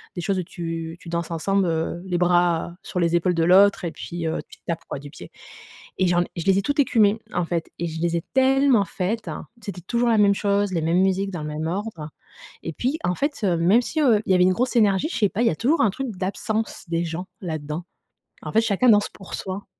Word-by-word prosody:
des 175 - -3
choses 190 +3 0
où 180 - -2
tu, 165 -2 -5
tu 170 - -10
danses 170 0 -3
ensemble, 195 +4 +1
heu, 165 +1 -2
les 180 -2 -1
bras 175 -1 +2
sur 180 - -4
les 170 0 +2
épaules 180 +1 +1
de 165 - +2
l'autre, 195 +3 +5
et 170 - -2
puis, 170 0 -5
heu, 160 - -1
tu - - -16
tapes, 165 -1 -3
quoi, - - -5
du 145 +1 -10
pied. - - -11 0.7
Et 185 - +3
j'en 175 0 +3
je 165 - -3
les 195 -1 +4
ai - - 0
toutes 285 +7 -2
écumées, 220 -6 +3
en 175 - +1
fait, 165 -1 -3
et 170 - -1
je 160 0 -6
les 170 0 0
ai - - -2
tellement 265 -4 +4
faites, 200 +5 -3 0.3
c'était 200 -4 -7
toujours 240 +6 0
la 225 - +3
même 200 -1 +5
chose, 200 0 +1
les 165 - 0
mêmes 170 +3 +2
musiques 195 +1 +1
dans 175 - -5
le - - -4
même 155 +1 -4
ordre. 175 -4 -4 0.5
Et 165 - -4
puis 260 - -1
en 180 - +1
fait, 285 - -2
même 180 +5 +3
si, 310 +6 -2
heu, 240 -8 +4
il - - +3
y - - +5
avait 180 - +5
une 185 - +4
grosse 250 +5 -1
énergie, 205 +3 +3
je - - -4
sais 210 - +3
pas, 220 - -1
il - - +3
y - - +2
a - - -1
toujours 290 +8 +1
un 215 - +4
truc 270 +7 -4
d'absence 205 +4 -3
des 170 0 0
gens, 170 +2 -5 0.2
là-dedans. 155 -1 -4 0.6
En - - -6
fait, 225 - +4
chacun 225 +2 +2
danse 210 -2 +5
pour 195 - -13
soi. 190 +1 -5
185 Hz, 250 wpm, -23 LUFS, 170-210 Hz, 0.7 s, l'autre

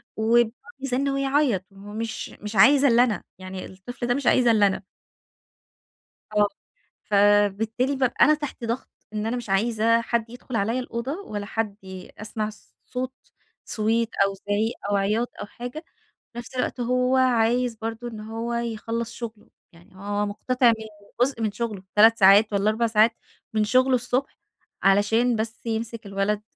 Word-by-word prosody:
وبيقعد 225 +1 +3 0.3
بيزّن 275 +1 -1
ويعيط 275 -7 +1
مش 210 +3 -6
مش 210 +1 -6
عايز 275 +8 +6
إلّا 240 -1 +6
أنا، 220 -7 -1
يعني 185 0 -7
الطفل 240 +6 -7
ده 245 - +3
مش 275 -1 -2
عايز 250 -2 +4
إلَّا 215 -3 +5
أنا. 190 0 -3 1.5
آه، 210 -1 +4 0.6
فبالتالي 205 +5 +2
بابقى 260 -2 +3
أنا 305 - +5
تحت 290 -5 -5
ضغط، 235 +3 -3 0.2
إن 210 0 -2
أنا 240 +2 -1
مش 235 -4 -7
عايزة 225 +3 +2
حد 230 -1 -1
يدخل 245 0 -8
عليَّ 225 +4 0
الأوضة 245 +1 -4
ولا 205 -1 -5
حد 215 -1 -2 0.4
أسمع 215 0 -4 0.4
صوت 255 +1 -4 0.5
صويت 225 +1 0 0.2
أو 195 - -2
زعيق 205 +4 -1 0.2
أو 205 - +2
عياط 215 +5 +1
أو - - -4
حاجة، 245 +9 -8 0.5
في - - -11
نفس 240 +2 -8
الوقت 250 0 -2
هو 250 +2 +1
عايز 245 -1 +2
برضه 225 +2 -5
إن 220 -2 -7
هو 225 +2 -4
يخلص 230 0 -3
شغله، 225 -3 -8 0.2
يعني 175 +3 -20
هو 205 +2 -2
مقتطع 250 +5 +1
من 220 -1 +2 0.4
جزء 250 -2 +1
من 215 -2 0
شغله 210 -3 -4
3 225 +2 +6
ساعات 205 +2 +6
والّا 200 +1 +2
4 230 +2 +1
ساعات 225 +1 +4 0.4
من 215 -1 +2
شغله 255 +4 +3
الصبح، 250 +2 -1 0.5
علشان 225 +5 +3
بس 225 +1 -4
يمسك 225 0 -4
الولد، 200 +1 -1
225 Hz, 155 wpm, -24 LUFS, 210-245 Hz, 1.5 s, عايز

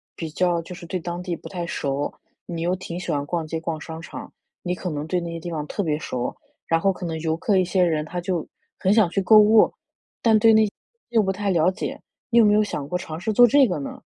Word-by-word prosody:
比 165 - -5
较 175 +2 +1
就 175 +2 -9
是 175 - -10
对 185 +2 -3
当 175 +1 -5
地 180 -1 -3
不 - - -11
太 175 -3 -4
熟， 140 -3 -2 0.3
你 170 -1 -5
又 175 +2 +1
挺 180 -2 -6
喜 180 - -4
欢 145 -1 -1
逛 165 +1 -2
街、 160 +1 -4
逛 160 -1 -4
商 160 +1 -7
场， - - -9 0.3
你 180 - -2
可 180 0 -4
能 150 -2 -4
对 180 +2 0
那 170 -1 -5
些 165 - -5
地 170 +1 -6
方 155 -2 -3
特 205 - -2
别 155 -3 0
熟， 125 -5 -3 0.3
然 165 - +2
后 195 +3 +2
可 180 - -7
能 165 -1 -3
游 160 0 0
客 195 +4 +1
一 185 - +3
些 185 +1 +2
人， 155 -3 +1
他 175 +3 -4
就 175 -2 -2 0.3
很 190 - +3
想 210 -5 +4
去 195 - 0
购 215 +3 +6
物， 215 +1 +6 0.5
但 225 -2 +5
对 225 +1 +6
那 220 0 +5
些 205 - -4 0.4
又 230 -2 +3
不 190 -2 0
太 200 +1 -2
了 170 -1 +3
解， 190 - -5 0.3
你 235 0 +5
有 225 - +7
没 205 - +5
有 210 0 +4
想 150 -9 -4
过 180 - -1
尝 160 -3 -7
试 215 +4 -2
做 245 +3 +8
这 275 +2 +5
个 180 - -2
呢？ 140 - -7
175 Hz, 290 characters per minute, -23 LUFS, 160-200 Hz, 0.5 s, 做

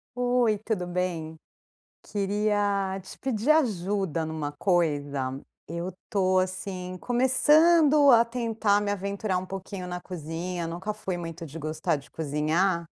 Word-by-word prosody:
Oi, 245 -4 +2
tudo 210 -4 -2
bem? 175 -3 -3 0.7
Queria 200 -1 0
te 190 - -11
pedir 250 +1 -1
ajuda 195 - +1
numa 155 -2 -4
coisa. 145 -6 0 0.3
Eu 170 +2 -4 0.2
tô 185 -3 +2
assim, 185 0 -3
começando 295 +4 +5
a 235 -1 +7
tentar 225 -3 +1
me 205 - -1
aventurar 200 -1 -1
um 185 - -5
pouquinho 190 -1 -6
na 180 0 -5
cozinha. 170 +1 -4
Nunca 175 +6 -4
fui 195 -3 -4
muito 165 -1 -6
de 155 +2 -9
gostar 155 +2 -1
de 140 - -13
cozinhar 160 +4 0
185 Hz, 130 wpm, -27 LUFS, 170-215 Hz, 0.7 s, a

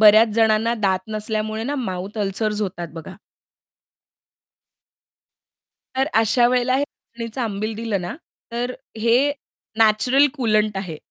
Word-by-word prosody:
बऱ्याच 215 +1 +8
जणांना 225 +1 +3
दात 190 -3 +2
नसल्यामुळे 215 0 -2
ना 285 +4 -2
माउथ 195 -4 -4
अल्सर्स 210 +1 -1
होतात 175 -3 -4
बघा. 165 +3 -8 2.8
तर 265 +1 +1
अशा 225 +2 +4
वेळेला 250 +1 +2
हे 280 - +1
नाचणीचं 235 -3 -9
आंबील 215 -1 -2
दिलं 220 -3 -2
ना, 175 0 -5 0.4
तर 245 +1 -2 0.3
हे 245 +6 +3 0.5
नॅचरल 225 +6 +5
कुलंट 215 -6 +1
आहे, 185 -5 -4
220 Hz, 120 wpm, -22 LUFS, 205-240 Hz, 2.8 s, बऱ्याच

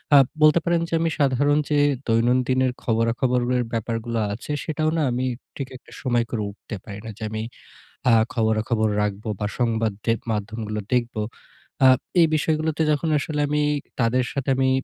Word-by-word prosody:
আ - - +10 0.2
বলতে 155 +2 +6
পারেন 170 -1 +2
যে 165 - -8
আমি 165 - +2
সাধারণ 145 +1 +3
যে 150 -1 +3 0.3
দৈনন্দিনের 125 +3 +2
খবরাখবরের 120 +2 +1
ব্যাপারগুলো 115 +1 -2
আছে 120 +7 -7
সেটাও 155 0 0
না 160 - +2
আমি 125 +1 -1 0.3
ঠিক 135 -2 -4
একটা - - -20
সময় 120 -3 +1
করে 110 -3 -1
উঠতে 110 +2 -9
পারি 100 -1 -8
না। - - -5
যে 110 - -7
আমি 110 0 -3 0.7
আ - - +6 0.2
খবরাখবর 110 0 +1
রাখবো 105 +1 -3
বা 105 - -1
সংবাদ 115 -3 +1
দে 115 - +3 0.2
মাধ্যমগুলো 105 0 -3
দেখব। 120 -1 0 0.7
আ - - +9 0.3
এই 165 - +6
বিষয়গুলোতে 155 +1 0
যখন 150 +2 0
আসলে 150 +1 -3
আমি 150 0 +1 0.4
তাদের 125 +2 +2
সাথে 140 -1 -2
আমি 130 0 +3
125 Hz, 160 wpm, -23 LUFS, 115-145 Hz, 0.7 s, আ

